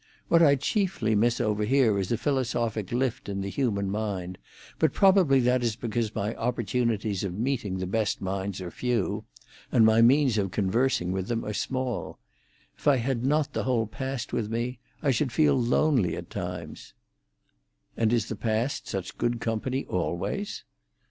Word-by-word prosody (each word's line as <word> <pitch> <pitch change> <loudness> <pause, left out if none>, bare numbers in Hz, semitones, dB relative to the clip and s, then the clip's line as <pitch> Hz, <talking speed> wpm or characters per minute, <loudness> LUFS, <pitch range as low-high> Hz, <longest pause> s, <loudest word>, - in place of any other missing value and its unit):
What 170 - +5
I 145 -4 +6
chiefly 145 - 0
miss 115 +3 +2
over 105 -3 0
here 115 -3 +3
is 95 +2 -2
a 115 - +2
philosophic 120 -6 -1
lift 125 -3 -1
in 100 -1 -3
the 100 0 -4
human 100 -7 0
mind, 95 -4 -3 0.4
but - - +3
probably 190 -9 +5
that 125 0 +2
is 115 -3 0
because 115 -1 -2
my 105 +1 -1
opportunities 115 -4 -1
of 95 -2 -3
meeting 115 -5 -1
the 95 - -3
best 105 +2 0
minds 95 0 -3
are 90 -1 -6
few, 110 -3 -1 0.5
and 115 - +5
my 110 +1 +5
means 130 -1 +4
of 95 -1 0
conversing 100 0 +1
with 95 0 -2
them 115 -1 -2
are 105 - -3
small. 130 +2 -3 0.6
If - - -7
I 140 -2 +6
had 120 0 -1
not 150 +2 +1
the - - -2
whole 120 -3 +1
past 130 +3 -5
with 110 -3 -1
me, 120 +2 -2 0.2
I 140 - +3
should 130 +1 0
feel 150 +2 +4
lonely 125 - +2
at 85 0 -8
times." 90 -3 -6 1.0
"And 115 -1 +1
is 120 -2 +1
the 110 - -4
past 115 +5 -1
such 95 -1 -5
good 120 0 0
company 115 +4 -2
always?". 90 - -3
115 Hz, 170 wpm, -27 LUFS, 100-130 Hz, 1.0 s, I